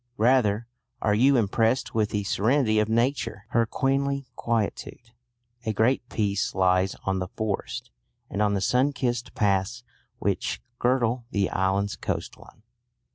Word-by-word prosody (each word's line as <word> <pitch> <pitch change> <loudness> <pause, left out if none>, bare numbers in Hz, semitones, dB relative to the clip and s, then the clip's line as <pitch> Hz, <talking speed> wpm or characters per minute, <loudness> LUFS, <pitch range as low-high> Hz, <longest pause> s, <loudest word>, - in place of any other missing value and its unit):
Rather 115 -2 +3 0.3
are 105 - +1
you 130 +5 +4
impressed 115 +3 +1
with 110 -2 +1
the 105 -1 -1
serenity 110 +2 +2
of 105 0 +1
Nature, 115 -2 0
her 115 0 +2
queenly 140 +2 0
quietude. 115 +1 -3 0.5
A 110 -2 -1
great 120 +3 +1
peace 100 -4 -1
lies 95 0 +2
on 95 0 0
the 90 - -3
forest, 105 +1 -4 0.4
and 100 - -3
on 105 -1 +2
the 95 - -1
sunkissed 125 +1 0
paths 100 +3 0 0.3
which - - -1 0.2
girdle 120 -1 +1
the 100 -4 0
island's 95 +2 0
coastline. 105 - -6
110 Hz, 130 wpm, -26 LUFS, 100-125 Hz, 0.5 s, you